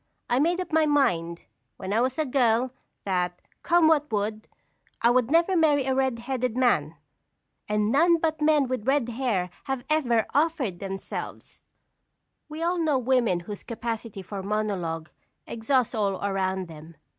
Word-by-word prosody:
I 245 - +3
made 340 +5 +2
up 365 - -4
my 315 -1 +4
mind, 170 - +1 0.3
when 190 +1 -4
I 225 - +3
was 255 +1 0
a 310 - +1
girl, 250 -2 +2 0.3
that, 180 -2 -1 0.2
come 340 -2 +4
what 300 -3 +2
would, 215 +1 -2 0.5
I 235 - +4
would 250 -1 +2
never 335 +4 +3
marry 295 -5 +3
a 265 - +1
red 265 -2 +1
headed 250 0 -3
man, 165 - +2 0.7
and 210 0 +1
none 335 +5 +4
but 315 -1 -1
men 300 -3 +3
with 255 -2 -4
red 270 -3 +2
hair 225 -8 -1
have 270 -2 -3
ever 240 -8 +2
offered 285 - 0
themselves." 195 -1 -7 0.9
We 310 +2 -5
all 350 +1 0
know 310 -4 +2
women 245 -8 +1
whose 205 +3 -8
capacity 230 -3 -5
for 195 +1 -6
monologue 190 -6 -2 0.3
exhausts 240 +2 0
all 205 -4 0
around 190 -2 -1
them. 160 0 -12
240 Hz, 155 wpm, -26 LUFS, 200-290 Hz, 0.9 s, my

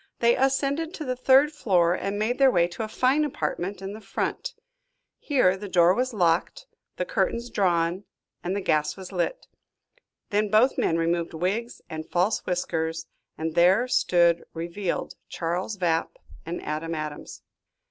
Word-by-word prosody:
They 235 0 +4
ascended 275 +5 0
to 310 - -6
the 255 -1 -1
third 265 +4 +5
floor 180 - +2
and 200 +2 -3
made 225 +5 -1
their 270 -1 +7
way 175 -7 +3
to 175 - -7
a 220 - -2
fine 255 +7 +2
apartment 195 -9 -3
in 195 +1 -5
the 215 - -9
front. - - -3 0.6
Here 250 -11 +2
the 200 +1 -8
door 175 -1 +5
was 255 +5 -1
locked, 180 - 0 0.3
the - - -1
curtains 245 - -1
drawn, 175 0 +1 0.4
and 180 +2 -2
the 200 - -1
gas 150 +2 +1
was 190 -1 -9
lit. 200 - -2 0.9
Then 210 0 +1
both 220 +6 +4
men 165 - +1
removed 170 0 -1
wigs 200 +8 -2
and 155 0 -7
false 185 +5 +1
whiskers, 165 -2 -2 0.3
and 160 0 -3
there 185 +8 +4
stood 170 -7 +3
revealed 170 +3 -3 0.2
Charles 175 +5 -3
Vapp 165 -3 0 0.3
and 170 +1 -4
Adam 160 +2 -3
Adams. 155 -1 -6
190 Hz, 160 wpm, -26 LUFS, 170-245 Hz, 0.9 s, their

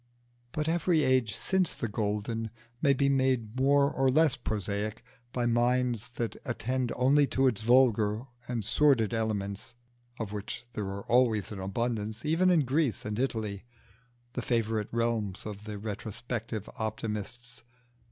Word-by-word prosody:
But 150 0 -2
every 165 -1 +2
age 130 -6 +2
since 190 -3 +1
the 115 - -2
golden 105 +2 -2 0.3
may 145 - +5
be 140 +1 +2
made 130 -5 +1
more 140 +2 +4
or 135 0 +2
less 155 +1 +4
prosaic 105 +1 -3 0.3
by 120 -1 -1
minds 120 0 +1
that 115 -2 -2
attend 125 +1 -1
only 140 +3 +4
to 135 0 +1
its 115 -5 +2
vulgar 115 -3 +4 0.2
and 115 -4 -2
sordid 125 -3 +3
elements, 110 0 -2 0.4
of 110 -3 -4
which 105 +3 -5
there 105 - -3
was 100 +1 -5
always 115 -5 +3
an 100 - -6
abundance 110 +2 -2
even 165 +4 +3
in 175 -3 +5
Greece 135 -1 0
and 105 +1 -3
Italy, 110 -6 -2 0.7
the 125 - -2
favourite 110 -3 0
realms 115 -4 -1
of 105 0 -7
the 105 -1 -5
retrospective 110 +1 -5
optimists. 110 +2 -4
115 Hz, 140 wpm, -30 LUFS, 105-130 Hz, 0.7 s, may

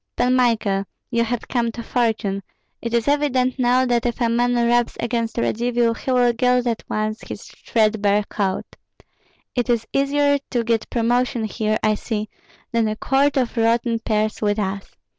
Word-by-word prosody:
Pan 250 +1 +2
Michael, 220 -6 +1 0.3
you 235 -1 +2
have 235 0 -3
come 235 -2 0
to 235 - -6
fortune. 220 -5 0 0.4
It 235 - -4
is 235 +1 0
evident 270 -3 +1
now 250 +1 +3
that 240 -2 +1
if 240 - -3
a 235 -2 +2
man 245 +1 +2
rubs 240 0 +2
against 235 -1 -2
Radzivill 235 0 +1
he 265 - -7
will 245 -1 +3
gild 250 +1 +2
at 230 -2 -1
once 215 +1 -2
his - - -8
threadbare 210 -2 +1
coat. 195 -2 -2 0.9
It 245 0 -1
is 235 -2 +1
easier 285 +1 +2
to 240 -2 0
get 230 -1 0
promotion 240 0 +1
here, 215 0 -1
I 215 0 +3
see, 210 0 -3 0.4
than 230 -1 +2
a 215 - -1
quart 275 +5 +1
of 255 -2 0
rotten 230 0 +1
pears 215 -1 -1
with 205 -1 +1
us. 195 -1 -4
235 Hz, 170 wpm, -21 LUFS, 220-245 Hz, 0.9 s, now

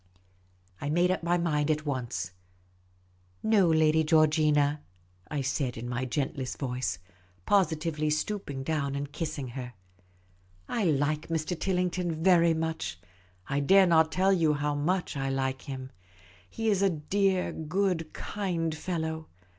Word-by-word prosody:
I 145 - -2
made 175 +4 +3
up 185 - -1
my 170 +1 +1
mind 155 -3 0
at 155 0 0
once. 120 - -3 0.5
" 90 0 -36
No, 215 -4 +4
Lady 160 0 +4
Georgina," 150 -2 +3 0.5
I 150 -2 -2
said, 135 -2 -1
in 120 +2 -5
my 125 +1 -2
gentlest 135 0 -3
voice 125 - -2 0.2
— 90 0 -32
positively 160 -5 +1
stooping 150 -3 -2
down 140 -2 -1
and 140 0 -4
kissing 150 -4 -4
her. 125 0 -7 0.5
" 90 0 -34
I 225 -4 -1
like 150 -1 +1
Mr. 165 +2 -1
Tillington 180 -1 -1
very 170 -3 +5
much. 160 - -3 0.5
I 140 - 0
dare 190 +7 +6
not 160 -2 +4
tell 190 +1 +3
you 160 -5 +3
how 145 0 -1
much 165 +5 -1
I 135 -1 -1
like 135 0 -1
him. 130 -1 -7 0.6
He 225 - 0
is 200 -2 +1
a 200 - +4
dear, 185 +4 0
good, 165 0 -1
kind 175 -6 -2
fellow. 160 -1 -3
155 Hz, 145 wpm, -29 LUFS, 135-175 Hz, 0.6 s, dare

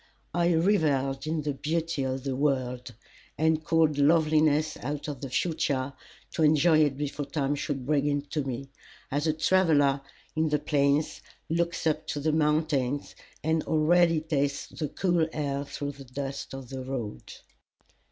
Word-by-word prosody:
I 175 0 +2
revelled 150 -6 +1
in 155 -1 -1
the 145 -1 -1
beauty 160 +2 -2
of 130 0 -2
the 135 -2 -2
world, 125 -3 -1 0.4
and 160 0 +2
called 155 -3 +2
loveliness 155 0 +3
out 145 +3 -4
of 140 -4 -5
the 135 - -5
future 140 -3 0 0.4
to - - -3
enjoy 155 +1 +5
it 145 -3 +2
before 145 0 -3
time 145 -2 -1
should 140 -2 -3
bring 145 0 +2
it 145 0 -1
to 150 - 0
me, 135 +1 -5 0.4
as 145 +3 0
a 155 - +3
traveller 155 -4 +3 0.3
in 160 0 +1
the 150 - +2
plains 145 0 +1 0.3
looks 170 +1 -1
up 155 0 0
to 145 - -2
the 155 +2 +1
mountains, 150 -3 +1 0.3
and 160 0 +1
already 165 +1 +3
tastes 145 -3 -1
the 150 -3 -4
cool 175 -1 +1
air 140 -2 -2
through 145 0 -4
the 140 -1 -12
dust 135 +1 -5
of 135 -2 -9
the 130 -1 -5
road. 120 - -5
150 Hz, 160 wpm, -28 LUFS, 140-160 Hz, 0.4 s, enjoy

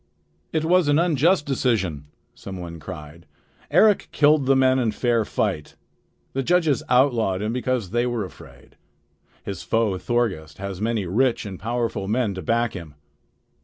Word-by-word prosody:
"It 160 -1 -1
was 180 -1 +3
an 145 0 +4
unjust 165 0 +2
decision," 105 - -1 0.3
some 95 -1 -9
one 85 -1 -7
cried. 80 -1 -10 0.4
"Eric 215 -2 +4
killed 150 -2 +3
the 135 - +5
men 130 0 +3
in 120 -3 +1
fair 115 0 +1
fight. 75 -6 -2 0.6
The 135 - -1
judges 165 -1 +2
outlawed 120 -7 +2
him 110 +2 -2
because 125 -6 -2
they 120 +2 +1
were 120 -4 -2
afraid. 90 - -15 0.7
His 100 -3 -6
foe 110 -5 0
Thorgest 95 -11 -2
has 100 -1 -6
many 110 -2 -1
rich 115 +7 +1
and 95 -3 -7
powerful 115 -3 -2
men 110 -1 0
to 95 - -6
back 115 +6 0
him." 85 -6 -9
115 Hz, 155 wpm, -23 LUFS, 95-130 Hz, 0.7 s, the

